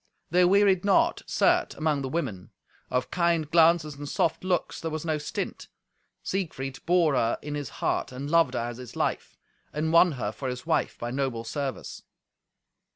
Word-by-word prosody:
They 180 +1 +5
wearied 195 0 +4
not, 200 -1 +3
certes, - - +2
among 155 -2 0
the 135 - -3
women. 130 - -3 0.4
Of 125 0 -1
kind 170 -3 +1
glances 165 -2 +4
and 145 0 -7
soft 165 +1 0
looks 185 -2 -1
there 165 - -2
was 155 0 -4
no 155 -2 0
stint. 150 - -5 0.6
Siegfried 135 -8 -4
bore 170 -4 +4
her 120 -3 +1
in 150 - -5
his 145 -3 -4 0.2
heart, - - 0
and 130 +3 -6
loved 160 -5 +3
her - - 0
as 120 -1 -6
his 125 -2 -10
life, - - -2 0.3
and 160 +2 -1
won 170 0 +6
her 115 -6 -3
for 130 +4 -5
his 125 0 -6
wife - - 0
by 120 0 -4
noble 130 -3 -2
service. 135 +3 -5
150 Hz, 175 wpm, -27 LUFS, 130-170 Hz, 0.6 s, won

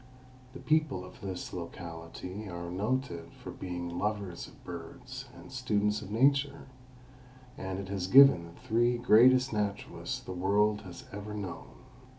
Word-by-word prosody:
The 130 - -8
people 155 -12 +1
of 90 - -14
this 95 -2 -5
locality 85 +3 -7
are 85 0 -5
noted 100 -3 -2
for - - -9
being 90 -1 -5
lovers 100 -4 -2
of - - -18
birds 125 +10 -8
and - - -12
students 105 -5 0
of 100 - -8
nature, 140 +5 +2 0.9
and 95 0 -4
it 95 0 -6
has 95 -2 -2
given 135 -7 +8
the 85 - -14
three 120 +2 +3
greatest 125 +2 +6
naturalists 105 -2 -2
the - - -8
world 105 +3 +2
has 90 -4 -10
ever 105 +1 -6
known. 100 -4 -7
105 Hz, 145 wpm, -31 LUFS, 90-125 Hz, 0.9 s, given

